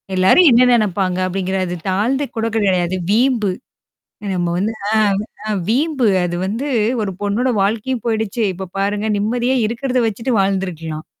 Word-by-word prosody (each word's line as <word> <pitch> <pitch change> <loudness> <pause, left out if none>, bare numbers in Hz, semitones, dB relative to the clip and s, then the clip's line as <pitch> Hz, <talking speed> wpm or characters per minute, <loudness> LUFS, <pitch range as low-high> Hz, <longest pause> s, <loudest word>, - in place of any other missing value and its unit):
எல்லாரும் 190 - +5
என்ன 250 +2 +5
நினப்பாங்க 190 -4 +1
அப்பிடிங்கிறத 185 -1 -2
தாழ்ந்து 245 +9 0
கூட 225 - 0
கிடையாது. 190 -4 +2
அது 185 - -2
வீம்பு. 230 -3 +2 0.8
நம்ம 175 -1 -1
வந்து 215 +4 -1 0.2
ஆ, 220 - +1 0.5
அ 215 - 0 0.2
வீம்பு. 270 0 +1 0.2
அது 175 0 -3
வந்து 225 +8 -3 0.4
ஒரு 195 - -2
பொண்ணோட 210 +6 0
வாழ்க்கையும் 230 +4 -1
போயிடுச்சு. 220 +1 -1
இப்ப 190 0 -7
பாருங்க 205 +2 -1
நிம்மதியா 240 +5 0
இருக்கிறத 250 +2 -1
வச்சுட்டு 230 +4 -2
வாழ்ந்துருக்கலாம். 180 -5 -2
210 Hz, 140 wpm, -18 LUFS, 190-240 Hz, 0.8 s, எல்லாரும்